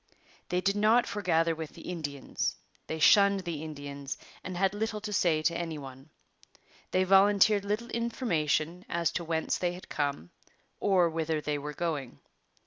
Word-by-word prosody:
They 180 0 +1
did 195 +2 +1
not 220 +4 +4
forgather 165 -5 +1
with 160 -1 -7
the 165 - -12
Indians. 150 -6 -3 0.3
They 160 - -3
shunned 200 +5 +5
the 170 -4 -4
Indians 140 -2 -6 0.3
and 185 -1 -5
had 195 +1 +2
little 215 +1 -2
to 210 0 -5
say 165 -5 +2
to 170 +2 +2
any 165 -2 -3
one. 135 0 -10 0.8
They 185 - +2
volunteered 200 +2 +5
little 215 +4 -2
information 180 - -1
as 170 -1 0
to 175 - -3
whence 160 -1 -1
they 175 -1 0
had 180 - -11
come 140 - -2 0.5
or 190 -4 +4
whither 160 -1 -1
they 150 -1 -2
were 150 +1 -5
going. 150 -7 -3
170 Hz, 160 wpm, -29 LUFS, 155-200 Hz, 0.8 s, shunned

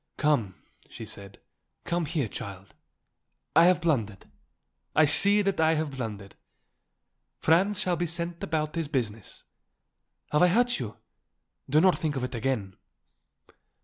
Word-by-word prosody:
"Come," 120 -11 +1 0.3
she - - -9
said, 100 0 -8 0.5
"come 170 -2 -1
here, 145 -6 -1
child. 100 -4 -9 0.8
I 165 - +7
have 180 -1 +3
blundered. 115 - -1 0.7
I 155 - +6
see 200 +7 +4
that 195 -4 0
I 160 0 +4
have 155 -1 -2
blundered. 105 -7 -6 1.0
Franz 185 +5 +2
shall 180 -2 +1
be 175 +1 -1
sent 170 +1 -3
about 155 -2 -2
his 165 -3 -2
business. 115 -7 -4 0.9
Have 150 - +3
I 180 - +7
hurt 240 +7 +2
you? 110 -4 -6 0.7
Do 150 +3 +4
not 185 +2 +4
think 155 -4 -1
of 135 - -2
it 125 - -4
again." 115 -6 -2
150 Hz, 140 wpm, -27 LUFS, 115-170 Hz, 1.0 s, I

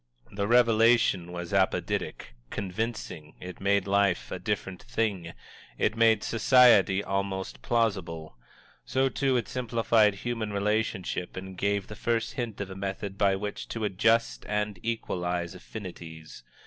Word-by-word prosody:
The 100 0 -2
revelation 115 -6 +4
was 90 +1 -6
apodictic, 95 -9 -1 0.2
convincing; 95 -6 -4
it 90 0 -9
made 100 +1 +2
life 100 -10 +1
a - - -4
different 95 -1 -3
thing; 105 -8 -2 0.4
it - - +1
made 115 -2 +4
society 115 -5 +5
almost 95 -1 -3
plausible. 95 - -1 0.5
So, 130 +1 +1
too, 135 -1 +1
it 120 - -2
simplified 115 -4 +2
human 115 -3 -2
relationship 100 -3 -1
and 95 0 -7
gave 100 +1 0
the 105 - -9
first 115 +1 -1
hint 120 -5 -4
of 95 -1 -5
a - - -7
method 95 +1 -4
by 100 -1 +3
which 105 +1 -5
to 115 - -4
adjust 115 +3 +2
and 105 -2 -1
equalize 90 -6 -2
affinities. 85 - -9
100 Hz, 135 wpm, -28 LUFS, 95-115 Hz, 0.5 s, society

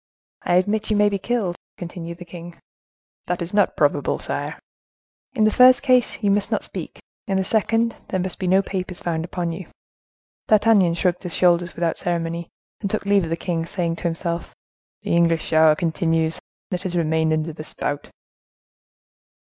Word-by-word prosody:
"I 175 - +1
admit 210 +4 +1
you 215 - +2
may 205 0 +5
be 200 -1 -2
killed," 205 -5 -1 0.2
continued 170 -1 -7
the 175 - -10
king. 175 0 -10 0.7
"That 180 - -1
is 170 +2 -4
not 205 - +2
probable, - - +2
sire." - - -4 0.8
"In 220 - +1
the 215 - +4
first 255 +3 +6
case, 255 -4 +2
you 200 - +3
must 200 0 +1
not - - 0
speak; - - -6 0.3
in 195 - +1
the 190 - +1
second 225 +3 +1
there 185 - -1
must 185 0 -4
be 185 - -2
no 190 +2 +4
papers 185 -2 -4
found 165 -2 -2
upon 175 -1 -3
you." 165 +1 -7 0.8
D'Artagnan 205 -5 +4
shrugged 180 0 0
his 180 -3 -4
shoulders 175 -3 +2
without 170 -1 -1
ceremony, 170 -1 -2 0.3
and 200 - -3
took 215 0 -2
leave 200 -3 +3
of - - -6
the 165 - -1
king, 165 -2 -2
saying 170 -3 -2
to - - -9
himself:—"The 170 0 -4
English 165 -1 +3
shower 160 -1 +5
continues—let 165 +2 -2
us 180 -2 -3
remain 160 -1 +1
under 155 +1 -1
the 155 - -8
spout!" 145 -1 -4
175 Hz, 175 wpm, -22 LUFS, 165-200 Hz, 0.8 s, first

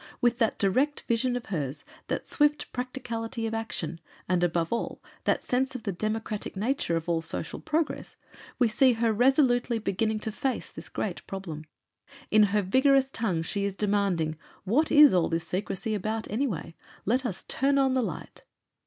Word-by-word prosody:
With 240 0 +2
that 225 - +2
direct 260 +9 +1
vision 245 +2 0
of 245 - -4
hers, 150 -7 -3 0.2
that - - -3
swift 295 0 +1
practicality 235 -2 -4
of 225 - -2
action, 210 -7 -4 0.3
and 180 -1 +2
above 170 0 +1
all, 235 - -3 0.3
that - - +2
sense 260 +1 0
of 245 - -5
the 205 - -1
democratic 215 +2 -3
nature 210 -4 0
of 165 0 -2
all 165 -1 +1
social 165 0 -4
progress, 315 0 -2 0.4
we 245 - +4
see 245 +4 +4
her 225 -1 +1
resolutely 245 0 +3
beginning 220 +1 0
to 220 - -2
face 260 +5 -2
this - - -10
great - - -3
problem. 170 -6 -6 0.7
In 215 0 +7
her 205 0 +2
vigorous 265 +6 +4
tongue 185 -10 -1
she 200 +4 -2
is 200 -1 -1
demanding 195 -7 0 0.2
"What 265 +11 +2
is 295 -4 +8
all 180 -2 +3
this 165 0 -1
secrecy 195 +5 -2
about, 215 +2 -2
anyway? 215 - -2 0.3
Let 250 +6 +2
us 220 -8 -4
turn 275 +1 +2
on 270 -1 +3
the 260 - +2
Light!" 230 - -5
220 Hz, 170 wpm, -28 LUFS, 190-255 Hz, 0.7 s, is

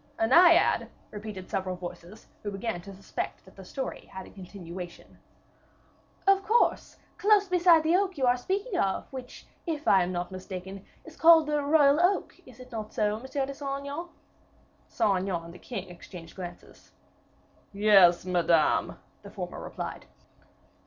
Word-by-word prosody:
"A 225 - +2
Naiad!" 340 +7 +5 0.2
repeated 210 -3 -7
several 185 -1 -2
voices, 180 +3 -10 0.2
who 205 - -4
began 200 -2 -4
to 195 - -11
suspect 195 - -6
that 190 - -18
the 195 - -11
story 265 +8 -6
had 190 -1 -8
a - - -14
continuation. 180 -2 -10 1.1
"Of 390 0 +5
course 460 +4 +1 0.2
close 410 -1 +4
beside 350 -3 +5
the 325 +2 +3
oak 380 -2 0
you 265 - +1
are 245 0 +4
speaking 385 - -2
of, 195 -1 0
which, 255 -1 -9 0.2
if 310 -2 -3
I 195 - +6
am 180 +1 -1
not 175 +1 -4
mistaken, 190 +1 -8 0.2
is - - -12
called 325 -1 +7
the 300 0 0
royal 285 0 +4
oak 370 +3 +1
is - - -15
it 255 0 -13
not 215 -2 -6
so, 210 0 0
Monsieur 265 +2 -3
de 275 - -6
Saint 275 0 -4
Aignan?" 290 +5 -6 0.8
Saint 205 -5 +1
Aignan 180 -3 -3
and 170 - -11
the 180 - -13
king 195 -7 -6
exchanged 170 -1 -12
glances. 180 -2 -10 0.8
"Yes, 195 -4 +5
Madame," 170 -3 +2 0.2
the - - -11
former - - -6
replied. - - -7
215 Hz, 160 wpm, -28 LUFS, 185-300 Hz, 1.1 s, called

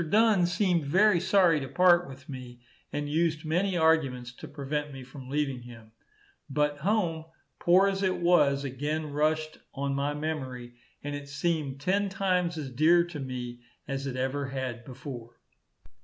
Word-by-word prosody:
Dunn 210 -4 +4
seemed 175 -4 +1
very 195 +4 +4
sorry 180 -3 +4
to 135 - -5
part 175 0 +4
with 135 +2 -12
me, 125 -4 -9 0.3
and 145 0 -3
used 160 +1 0
many 180 +4 +1
arguments 135 -7 +2
to - - -9
prevent 145 +1 -3
me 135 -1 -8
from 130 0 -11
leaving 140 -3 -1
him. 115 -2 -13 0.6
But 145 +1 0
home, 170 -3 0 0.3
poor 185 +3 +5
as 195 0 -1
it 185 -2 +1
was, 170 -6 +3
again 145 +3 -3
rushed 155 +1 0 0.2
on 140 0 -1
my 140 +1 -1
memory, 130 -6 -4 0.3
and 145 0 -4
it 145 0 -6
seemed 145 -2 -2
ten 200 +5 +1
times 180 -3 0
as 140 -4 -5
dear 160 +7 +5
to 170 -3 -7
me 125 -2 -5 0.3
as 135 0 -3
it 130 - -4
ever 135 +2 -1
had 130 -3 -4
before. 125 -3 -9
150 Hz, 160 wpm, -28 LUFS, 135-175 Hz, 0.6 s, poor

